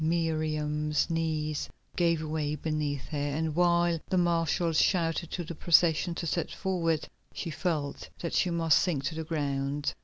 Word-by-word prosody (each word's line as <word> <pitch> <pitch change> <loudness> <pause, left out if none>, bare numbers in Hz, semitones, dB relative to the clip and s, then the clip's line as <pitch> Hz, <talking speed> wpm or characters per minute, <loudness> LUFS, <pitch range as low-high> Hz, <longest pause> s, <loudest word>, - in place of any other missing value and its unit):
Miriam's 155 -2 0
knees 155 -2 -1 0.3
gave 170 -2 +2
way 150 -1 -1
beneath 150 -2 -2
her, 150 - -3
and 150 +2 -1
while 175 -1 +3
the 185 - +1
marshals 170 -1 +2
shouted 170 -3 +1
to 175 - -3
the 170 - -6
procession 170 +1 +3
to 170 - -4
set 170 +1 -1
forward, 165 -5 -1 0.3
she 165 - -4
felt 155 -3 -2
that 170 - -4
she 180 - +2
must 165 -2 +3
sink 160 -8 0
to 135 - -2
the 160 0 -4
ground. 145 -2 -1
160 Hz, 155 wpm, -29 LUFS, 150-170 Hz, 0.3 s, while